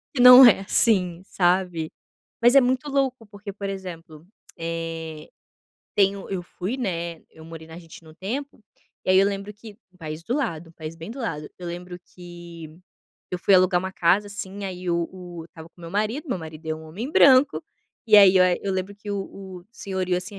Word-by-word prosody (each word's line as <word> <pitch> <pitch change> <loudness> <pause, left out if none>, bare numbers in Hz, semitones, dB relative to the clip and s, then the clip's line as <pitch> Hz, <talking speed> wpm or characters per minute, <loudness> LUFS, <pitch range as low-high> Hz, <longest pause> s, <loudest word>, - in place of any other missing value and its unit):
Que 250 - +1
não 250 +1 +11
é 225 -5 +6
assim 185 -4 +1
sabe, 175 -3 0 0.5
Mas 240 +3 +5
é - - +10
muito 260 +3 0
louco 265 -4 -1
porque 205 0 -9
por 200 0 -5
exemplo, 170 -5 -9 0.3
eh, 165 -1 -6 0.7
tenho 195 -1 +1
eu 190 -2 -3
fui, 185 +6 -5
né, 170 -8 -4
eu 160 - -15
morei 160 0 -10
na 160 - -12
Argentina 165 -1 -13
o - - -17
tempo, 235 - -6 0.4
e - - 0
aí 185 - +6
eu 195 - +5
lembro 200 +1 -4
que, 210 0 -13 0.2
um - - -24
país 155 -2 -7
do 235 - -3
lado, 165 - -4
país 160 -1 -8
bem 165 +4 -9
do 250 - -9
lado, 150 - -4
eu 180 - -8
lembro 175 +1 -7 0.2
que 175 -2 -11 0.6
eu 180 - -2
fui 195 +2 +3
alugar 185 0 +4
uma 190 +1 -5
casa 185 +4 +2
assim 200 0 -6
aí 185 -1 -6
o 170 -1 0
o 175 -3 -9
estava 160 -1 -13
com 175 - -23
meu 165 -1 -9
marido, 215 - -2
meu 220 - -2
marido 160 -1 -10
é 160 - -1
um 160 - -11
homem 200 - -6
branco, 275 -1 +5 0.4
e 215 - +7
aí 195 -2 +8
eu 185 - +6 0.2
eu 195 - -2
lembro 190 +2 -3
que 205 +1 -9
o 200 -1 -2 0.4
o - - -22
senhorio 190 -4 -2
assim 190 +3 -6
185 Hz, 200 wpm, -24 LUFS, 165-205 Hz, 0.7 s, não